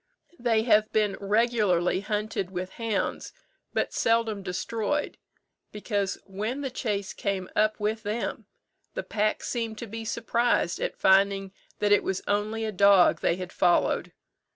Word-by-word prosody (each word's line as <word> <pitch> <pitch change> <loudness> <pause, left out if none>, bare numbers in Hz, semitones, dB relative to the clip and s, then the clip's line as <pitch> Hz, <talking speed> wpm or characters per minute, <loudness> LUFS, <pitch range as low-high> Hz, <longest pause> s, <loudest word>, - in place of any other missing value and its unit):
They 230 -2 +2
have 215 -2 +3
been 210 -2 +1
regularly 200 -4 +2
hunted 210 -2 -2
with 185 0 -5
hounds, 225 -3 -2 0.4
but - - -1
seldom 225 -3 +1
destroyed, 220 +9 -2 0.5
because 205 -2 -2
when 215 +8 -4
the 270 -2 -3
chase 205 -6 -2
came 195 -2 -2
up 215 +1 +2
with 215 +1 -1
them, 215 +2 -3 0.5
the - - -2
pack 215 0 -1
seemed 230 -3 -3
to 235 - -5
be 225 +1 -7
surprised 230 -4 0
at - - -3
finding 195 0 +3 0.2
that 205 0 +1
it 205 - +5
was 190 -1 -2
only 215 +2 0
a 215 - -2
dog 200 -2 +5
they 170 - +2
had 180 0 -7
followed. 175 -1 +2
210 Hz, 145 wpm, -27 LUFS, 195-225 Hz, 0.5 s, it